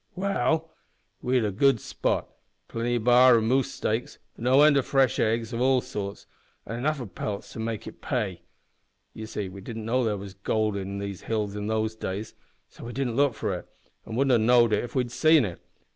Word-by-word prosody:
"Well, 160 -4 0 0.5
we 130 +1 +1
had 105 -5 -1
good 135 -4 +5
sport - - -1 0.4
plenty 120 +1 -1
of 120 - -1
b'ar 125 +1 +7
and 110 0 0
moose 130 +2 +2
steaks, 110 +3 -2 0.2
no 130 +4 +4
end 150 -1 +6
of 135 - 0
fresh 135 -3 +2
eggs 115 +1 0
of 115 - -2
all 130 0 +4
sorts, 100 -4 -6 0.4
and 115 - -5
enough 145 +5 -1
o' 125 - -4
pelts 100 0 -5
to - - -8
make 110 -1 -3
it - - -10
pay. 105 - -2 0.7
You 110 0 -7
see 105 -2 -4
we 95 +1 -10
didn't 110 +2 -7
know 125 +3 +1
there 105 -3 0
was 100 -1 -8
gold 105 +2 0
here 100 - -3
in 100 +1 -5 0.7
those 110 0 -1
days, 105 +1 -5 0.3
so - - -12
we 120 - -6
didn't 130 -4 -2
look 140 -3 +3
for - - -2
it, - - -6 0.4
an' 110 - -5
wouldn't 130 -2 +3
ha' - - +1
knowed 120 -1 +5
it - - +2
if 120 +2 -8
we'd 125 -2 0
seen 155 -1 +5
it. 90 -4 -7
115 Hz, 205 wpm, -26 LUFS, 110-130 Hz, 0.7 s, b'ar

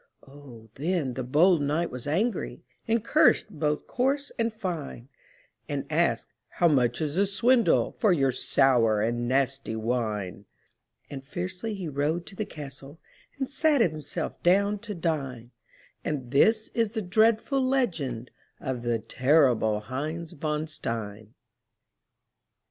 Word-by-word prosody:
Oh, 130 -6 -14
then 155 -2 -1
the 130 - -4
bold 155 +6 +4
knight 155 +4 0
was 125 +2 -7
angry, 205 +11 -1 0.2
And 225 -1 +1
cursed 290 -7 +4
both 150 -3 -1
coarse 275 +3 -1
and 230 0 +1
fine; 170 - -5 0.6
And - - -2
asked, - - +1
"How 175 - +2
much 125 -5 +2
is 155 +1 -2
the 200 +1 +3
swindle 235 +4 +3
For 215 - +4
your 135 -6 +3
sour 120 -4 +3
and 120 +2 -1
nasty 135 -2 0
wine?" 110 -5 -2 0.7
And 135 -2 -6
fiercely 185 +8 -5
he 190 -4 -5
rode 150 +4 -1
to - - -12
the 215 - -3
castle 145 -1 -9 0.4
And 270 -1 -2
sat 295 +1 +2
himself 155 -7 -2
down 200 +3 +3
to 210 -1 -7
dine; 135 -8 -3 0.5
And 130 -5 -3
this 215 +10 +3
is 230 -2 -1
the 220 - -1
dreadful 225 +7 +2
legend 165 - -1 0.3
Of 130 -2 -3
the 120 -1 0
terrible 120 -2 +2
Heinz 155 +8 -5
von 150 +1 -2
Stein. 110 -7 -5
150 Hz, 135 wpm, -27 LUFS, 125-200 Hz, 0.7 s, bold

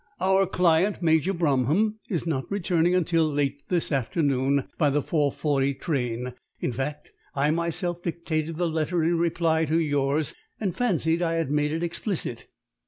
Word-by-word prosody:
"Our 190 +1 +3
client, 180 +2 +2
Major 160 +2 +3
Bromham, 170 - +1
is 170 -5 -1
not 145 -5 -2
returning 175 -3 +1
until 165 -3 +2
late 140 -1 -1
this 175 -3 0
afternoon 135 0 +1
by 150 -3 +4
the 145 0 +1
four 150 -4 +1
forty 140 -2 0
train, 125 -5 -2 0.3
in - - -1
fact. 135 +5 -4 0.2
I 145 +2 +2
myself 170 +1 -1
dictated 165 -2 -3
the 175 0 +1
letter 160 +1 0
in 170 +1 +2
reply 165 -1 +1
to 160 +2 +1
yours, 145 -1 +1 0.3
and 195 -6 -2
fancied 170 -8 +1
I 165 -1 +1
had 165 -4 -1
made 150 0 +1
it 165 +2 -2
explicit." 170 - -3
160 Hz, 160 wpm, -26 LUFS, 145-175 Hz, 0.3 s, by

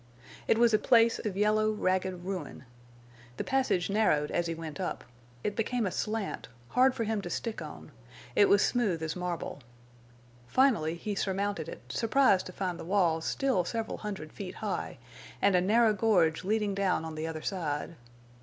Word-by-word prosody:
It - - +4
was 235 -1 +4
a 215 - +5
place 230 0 +4
of 200 -3 -4
yellow, 215 +1 +3
ragged 185 -3 -1
ruin. 180 -8 -5 0.7
The - - -2
passage 260 -10 +1
narrowed 195 -8 +2
as 175 0 0
he 165 - -2
went 160 -3 -7
up; - - -3 0.4
it 205 - -2
became 235 +1 0
a 185 - -1
slant, 215 0 -3 0.2
hard 260 +1 +4
for 230 - -1
him 220 -1 -1
to 175 - -6
stick 225 +5 -3
on; - - -9 0.4
it 405 - +5
was 400 - +5
smooth 200 -10 0
as 160 0 -3
marble. 180 -4 -4 0.9
Finally 215 - +3
he 205 +5 -4
surmounted 195 -4 -2
it, - - -9
surprised 230 -4 +2
to - - -7
find 180 -2 -3
the - - -6
walls 170 -3 +1
still 265 -10 +1
several 225 +5 -3
hundred 195 -8 -6
feet 190 -3 -7
high, - - -4 0.4
and 200 -2 +3
a 180 - +4
narrow 220 +3 +4
gorge 185 -7 +2
leading 210 +1 0
down 195 -4 0
on 160 - -6
the 155 +1 -4
other 160 -1 -5
side. 165 -4 -3
195 Hz, 175 wpm, -30 LUFS, 170-220 Hz, 0.9 s, a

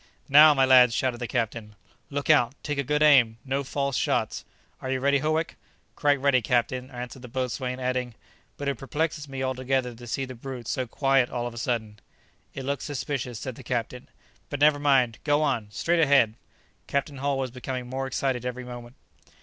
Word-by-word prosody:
"Now, 150 +2 +8
my 135 -1 +4
lads!" 125 -2 +6
shouted 125 -2 -1
the 120 - -3
captain. 115 -3 -3 0.3
"Look 145 0 -3
out! 140 -4 +4
take 150 -2 -2
a - - +1
good 150 +3 +1
aim! 125 -7 +5
no 135 +1 -1
false 140 0 -2
shots! - - 0 0.4
Are 130 - -5
you 130 0 0
ready, 140 +1 +2
Howick?" 155 +3 -1 0.4
"Quite 145 -2 +2
ready, 135 -2 +3
captain," 125 +2 0
answered 125 0 -8
the 125 - -9
boatswain, 125 +1 -3
adding, 125 -2 -2 0.4
"but 145 - -4
it 140 -4 -1
perplexes 150 +1 -3
me 135 -1 -4
altogether 130 -1 -1
to 120 +1 -12
see 135 +3 -2
the 130 - -8
brute 125 -1 -8
so 130 +1 -2
quiet 135 0 +2
all 120 -1 -3
of 120 - -5
a 120 - -7
sudden." 115 -5 -3 0.6
"It 135 - -5
looks 140 0 -2
suspicious," 135 -4 -4
said 130 +4 -5
the 130 - -12
captain; 120 +2 -4 0.4
"but 145 - -4
never 145 0 +5
mind; 130 -5 +2
go 145 0 +2
on! 125 -8 0
straight 165 +12 0
ahead!" 135 -7 +4 0.5
Captain 140 0 -2
Hull 140 0 -1
was 130 -2 -2
becoming 125 0 -5
more 135 +1 -3
excited 130 -1 -1
every 125 0 -4
moment. 120 0 -9
130 Hz, 190 wpm, -26 LUFS, 125-140 Hz, 0.6 s, Now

